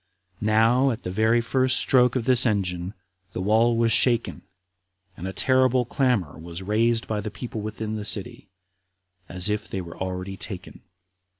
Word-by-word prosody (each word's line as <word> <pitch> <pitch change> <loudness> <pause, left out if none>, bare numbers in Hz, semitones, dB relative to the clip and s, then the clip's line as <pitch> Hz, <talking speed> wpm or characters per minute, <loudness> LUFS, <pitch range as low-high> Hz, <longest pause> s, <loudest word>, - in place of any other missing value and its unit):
Now, 115 +5 +3
at 120 -1 -4
the 90 - -4
very 110 +4 +2
first 130 +2 +1
stroke 125 -1 +4
of 125 -3 -1
this 130 -1 +6
engine, 95 -4 -1 0.4
the - - -5
wall 110 +4 +2
was 115 0 +2
shaken, 120 +1 +2 0.7
and 90 +2 -7
a - - -4
terrible 130 +2 +2
clamor 120 - -1
was 85 +2 -8
raised 115 +3 0
by 105 -1 -2
the 105 - -5
people 110 0 -7
within 110 0 -5
the 105 - -5
city, 100 -1 -3 0.8
as 90 +2 -2
if 105 +1 -2
they 95 - -5
were 85 -2 -8
already 95 +1 -4
taken. 95 -3 -7
110 Hz, 165 wpm, -24 LUFS, 95-120 Hz, 0.8 s, this